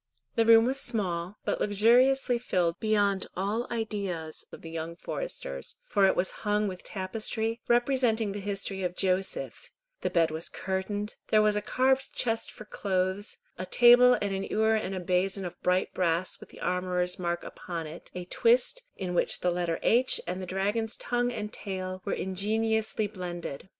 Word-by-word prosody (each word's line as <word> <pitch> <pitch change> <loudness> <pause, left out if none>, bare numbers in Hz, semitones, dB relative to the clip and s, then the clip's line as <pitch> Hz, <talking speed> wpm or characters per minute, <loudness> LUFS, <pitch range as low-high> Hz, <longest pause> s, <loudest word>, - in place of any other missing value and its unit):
The 230 -1 +2
room 225 0 +8
was 265 +2 0
small, 190 -7 -1
but - - -1
luxuriously 240 +5 +4
filled 175 -8 0
beyond 205 -3 +1
all 205 +5 -1
ideas 200 -8 -3
of - - -11
the 165 - -8
young 165 +1 -4
foresters, - - -6
for 200 - +3
it - - +2
was 185 - +1
hung 210 0 +1
with 185 -2 -6
tapestry, 220 +3 -3
representing 240 -3 +2
the 205 - -4
history 195 -1 -3
of 180 -1 -2
Joseph; 190 - -1 0.3
the - - 0
bed 165 -2 +2
was 160 +1 -4
curtained, 205 +2 -3
there 215 -1 +4
was 210 -1 +3
a 210 - 0
carved 265 +4 +1
chest 225 -2 0
for 215 - -11
clothes, 190 0 -1 0.2
a 185 - -3
table 245 +2 +7
and 195 -1 -1
a - - -6
ewer 220 +1 +3
and 190 -4 -2
basin 185 +2 +1
of 175 - -8
bright 180 +1 +1
brass 175 0 0
with - - -13
the - - -14
armourer's 180 0 0
mark 175 -1 -2
upon 170 -3 -6
it, 155 +2 -10
a 180 0 -5
twist 245 - +2
in 180 -2 -4
which - - +1
the 180 - +2
letter 175 -1 -1
H 250 +3 +4
and 180 +2 -3
the 185 - -6
dragon's 205 +4 -1
tongue 245 0 0
and 210 -2 -5
tail 185 -2 -5
were 200 - -1
ingeniously 220 +3 0
blended. 180 -5 -6
200 Hz, 170 wpm, -29 LUFS, 180-225 Hz, 0.3 s, room